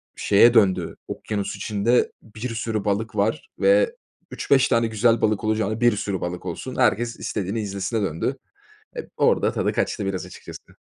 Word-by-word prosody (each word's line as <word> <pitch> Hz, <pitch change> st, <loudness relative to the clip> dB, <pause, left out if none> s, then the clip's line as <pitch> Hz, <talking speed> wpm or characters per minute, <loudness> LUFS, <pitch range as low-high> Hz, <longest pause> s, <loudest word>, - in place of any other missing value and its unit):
şeye 115 Hz, +4 st, +5 dB
döndü, 100 Hz, -5 st, +2 dB
okyanus 100 Hz, -2 st, -4 dB
içinde 105 Hz, +4 st, +1 dB
bir 110 Hz, +3 st, -7 dB
sürü 110 Hz, -2 st, -2 dB
balık 105 Hz, +2 st, -1 dB
var 105 Hz, +3 st, -1 dB
ve -, -, +3 dB, 0.4 s
3-5 135 Hz, -1 st, +2 dB
tane 115 Hz, -1 st, +2 dB
güzel 115 Hz, +1 st, +2 dB
balık 110 Hz, 0 st, +1 dB
olacağına 110 Hz, +1 st, -1 dB
bir 120 Hz, -3 st, +4 dB
sürü 100 Hz, -4 st, -3 dB
balık 90 Hz, +1 st, -5 dB
olsun. 95 Hz, +9 st, -5 dB
Herkes 120 Hz, -1 st, +1 dB
istediğini 100 Hz, +3 st, -3 dB
izlesine 100 Hz, +2 st, -2 dB
döndü, 80 Hz, -5 st, -2 dB, 0.6 s
eee, -, -, -6 dB
orada -, -, +2 dB
tadı -, -, 0 dB
kaçtı 100 Hz, -, -1 dB
biraz, 95 Hz, -3 st, -3 dB
açıkçası. -, -, -12 dB
110 Hz, 155 wpm, -23 LUFS, 100-115 Hz, 0.6 s, şeye